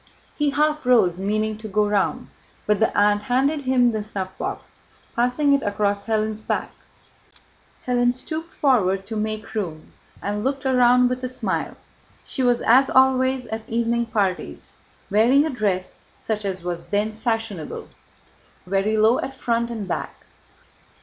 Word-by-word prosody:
He 295 -1 +1
half 300 +1 +1
rose, 225 -9 +3
meaning 215 +2 -1
to 220 - -7
go 210 +1 +1
round, 205 -2 0 0.4
but 210 -1 +2
the 220 - +1
aunt 205 0 +4
handed 270 +7 +1
him 250 -2 +3
the 215 -1 -2
snuffbox, 190 -3 -6 0.4
passing 250 +4 +2
it 280 - +3
across 200 -1 -1
Hélène's 220 -1 -1
back. - - -2 1.1
Hélène 245 -1 +2
stooped 315 +6 -5
forward 195 -9 +2
to 225 - -6
make 215 0 -3
room, 170 -8 -5 0.3
and 205 +1 -3
looked 270 +1 -2
round 250 -1 +5
with 250 +1 -3
a 255 - -2
smile. 255 - -3 0.5
She 270 - -3
was, 245 -1 +2
as 265 +4 +5
always 260 -1 +3
at 220 -1 -6
evening 235 +1 0
parties, 195 -5 -2 0.4
wearing 245 +8 +4
a 315 - -2
dress 200 -7 -2 0.2
such 215 -2 -3
as 185 -3 -3
was 175 -1 -4
then 210 +1 0
fashionable, 225 -6 -3
cut - - -22 0.7
very 195 +3 0
low 220 +3 +4
at 270 - -4
front 235 -2 -1
and 220 -4 -5
back. 175 - -5
225 Hz, 150 wpm, -23 LUFS, 205-255 Hz, 1.1 s, round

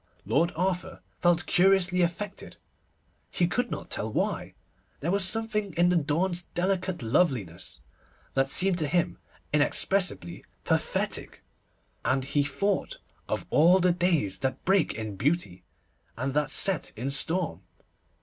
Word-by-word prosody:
Lord 170 +4 +2
Arthur 180 +1 -2 0.2
felt 175 0 +3
curiously 180 -1 +3
affected, 190 +4 -3 0.7
he 175 - +1
could 240 +8 -1
not - - -6
tell 110 +1 -1
why. - - -2 0.4
There 165 +5 -1
was 200 0 +2
something 210 -1 -1
in 175 +1 +4
the 180 - +2
dawn's 170 +3 +1
delicate 185 -3 -1
loveliness 115 - -1 0.5
that 135 0 +1
seemed 185 +3 +2
to 155 - +1
him 175 +3 0 0.3
inexpressibly 150 - 0 0.2
pathetic, - - -1 0.6
and 130 +1 +1
he 140 +1 +1
thought 200 - -1 0.3
of - - -2
all 175 +5 +6
the 180 0 +4
days 165 - +1
that 130 0 -2
break 190 -2 +3
in 110 -3 -5
beauty, 115 - -1 0.5
and 130 +3 -2
that 150 0 +1
set 190 +4 0
in 125 +5 -3
storm. 160 - 0
170 Hz, 130 wpm, -27 LUFS, 135-185 Hz, 0.7 s, all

